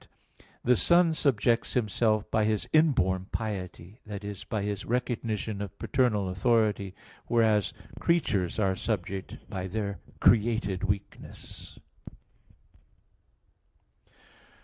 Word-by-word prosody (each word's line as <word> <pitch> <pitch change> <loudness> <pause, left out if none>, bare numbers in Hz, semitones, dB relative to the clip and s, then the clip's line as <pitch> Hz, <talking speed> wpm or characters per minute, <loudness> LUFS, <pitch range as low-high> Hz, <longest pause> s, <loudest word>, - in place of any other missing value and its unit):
"The 125 - +4
Son 170 +6 +4
subjects 120 -6 +1
Himself 110 -2 +1
by 110 -1 +2
His 110 -1 0
inborn 95 - +3
piety" 100 -1 -5
that 105 -1 -6
is, 100 -1 -6
by 105 -2 -3
His 100 0 -3
recognition 110 -4 -2
of 100 -1 -6
paternal 115 -7 +1
authority; 105 -1 +1 0.3
whereas 110 -3 +3 0.3
"creatures 105 - +1
are 95 -3 +2
subject 95 -2 -3
by 95 -2 -4
their 100 -2 -3 0.2
created 110 -4 +3
weakness." 100 0 -6
105 Hz, 100 wpm, -28 LUFS, 100-115 Hz, 0.3 s, The